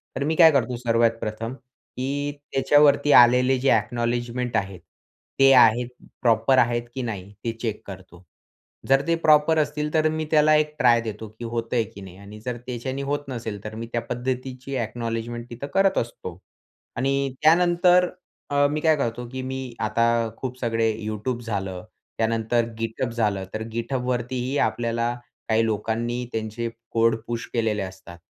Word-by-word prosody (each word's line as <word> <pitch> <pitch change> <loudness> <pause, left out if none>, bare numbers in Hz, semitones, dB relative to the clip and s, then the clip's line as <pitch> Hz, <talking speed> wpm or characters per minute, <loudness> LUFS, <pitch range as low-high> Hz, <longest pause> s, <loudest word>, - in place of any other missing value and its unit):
तर 135 - -1
मी 155 +3 0
काय 160 -1 +8
करतो 130 -3 0
सर्वात 115 -1 +2
प्रथम 110 +2 -4
की 135 +2 -5 0.2
त्याच्यावरती 145 +1 +4
आलेले 125 +2 +4
जे 135 +2 +2
अ‍ॅक्नॉलेजमेंट 120 +2 0
आहेत 95 -3 -3 0.6
ते 135 0 +7
आहेत 120 -1 +5 0.3
प्रॉपर 115 +2 +3
आहेत 120 -1 +2
की 130 - -2
नाही 100 -5 -5
ते 115 - -1
चेक 110 -3 -3
करतो. 95 -2 -11 0.7
जर 135 0 +5
ते 170 - +3
प्रॉपर 155 +1 +5
असतील 150 0 -1
तर 155 0 +3
मी 155 0 -2
त्याला 155 0 +5
एक 150 0 +1
ट्राय 120 -2 +5
देतो, 110 -1 -6
की 120 - -5
होतंय 115 0 -1
की 100 -2 -12
नाही 95 -1 -11
आणि 100 +2 -11
जर 125 -1 -3
त्याच्याने 130 +2 -4
होत 145 0 -2
नसेल 110 -5 -5
तर 110 0 -7
मी 115 +1 -6
त्या 120 - 0
पद्धतीची 130 +2 -4
अ‍ॅक्नॉलेजमेंट 115 0 -4
तिथं 120 +4 -7
करत 195 0 +3
असतो. 95 -7 -4 0.6
आणि 135 +1 0
त्यानंतर 175 +2 +4 0.4
अ, 145 0 +3
मी 150 - -1
काय 160 -1 +4
करतो, 120 -2 -2
की 130 +1 -5
मी 130 -1 -5
आता 115 +2 +1 0.3
खूप 130 -1 -5
सगळे 115 -2 0 0.2
Youtube 110 +3 -3
झालं. 95 -4 -4 0.3
त्यानंतर 115 +1 +1
GitHub 115 +2 -2
झालं 105 -5 0
तर 110 - -3
GitHubवरतीही 125 +2 -2
आपल्याला 115 0 -1 0.4
काही 110 +1 +3
लोकांनी 115 +2 -2
त्यांचे 110 +1 -3 0.2
कोड 115 0 +3
पुश 120 -1 -3
केलेले 110 -3 0
असतात, 95 -2 -9
120 Hz, 155 wpm, -24 LUFS, 115-135 Hz, 0.7 s, काय